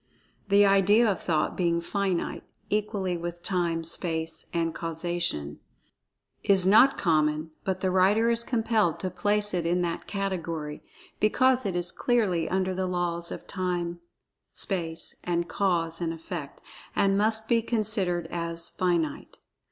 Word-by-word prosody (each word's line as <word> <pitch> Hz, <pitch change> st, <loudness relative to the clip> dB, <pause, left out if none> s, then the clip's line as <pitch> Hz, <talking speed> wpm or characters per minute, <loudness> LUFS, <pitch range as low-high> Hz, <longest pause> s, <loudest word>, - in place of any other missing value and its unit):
(The 200 Hz, +1 st, +6 dB
idea 200 Hz, +4 st, +5 dB
of 200 Hz, -3 st, 0 dB
Thought 160 Hz, -3 st, 0 dB
being 170 Hz, -2 st, +1 dB
finite, 190 Hz, 0 st, -2 dB, 0.3 s
equally 200 Hz, -4 st, -1 dB
with 175 Hz, 0 st, -6 dB
Time, 170 Hz, -3 st, 0 dB
Space 160 Hz, -1 st, -2 dB
and 165 Hz, -1 st, 0 dB
Causation, 165 Hz, -, -3 dB, 0.8 s
is 195 Hz, -2 st, +4 dB
not 220 Hz, +8 st, +6 dB
common, 155 Hz, -2 st, +1 dB
by 190 Hz, -, 0 dB
the 185 Hz, 0 st, -1 dB
writer 195 Hz, +5 st, +4 dB
is 235 Hz, 0 st, 0 dB
compelled 225 Hz, -8 st, +1 dB
to 185 Hz, -, -2 dB
place 205 Hz, +2 st, 0 dB
it 175 Hz, -2 st, 0 dB
in 175 Hz, +2 st, +1 dB
that 170 Hz, -1 st, -3 dB
category, 170 Hz, -7 st, -3 dB, 0.4 s
because 255 Hz, +2 st, +3 dB
it 185 Hz, -, -2 dB
is 175 Hz, 0 st, -1 dB
clearly 205 Hz, -9 st, +1 dB
under 185 Hz, 0 st, 0 dB
the 185 Hz, 0 st, -1 dB
laws 175 Hz, -1 st, -2 dB
of -, -, -7 dB
Time, 175 Hz, -2 st, -2 dB, 0.6 s
Space, 165 Hz, -4 st, -2 dB
and 170 Hz, -1 st, -1 dB
Cause 170 Hz, -4 st, 0 dB
and 165 Hz, -1 st, 0 dB
Effect, 165 Hz, -3 st, -7 dB, 0.3 s
and 195 Hz, 0 st, +3 dB
must 220 Hz, +2 st, +2 dB
be 230 Hz, -1 st, +3 dB
considered 210 Hz, -7 st, 0 dB
as 170 Hz, -1 st, -3 dB
"finite." 170 Hz, -5 st, -1 dB
180 Hz, 140 wpm, -27 LUFS, 170-200 Hz, 0.8 s, The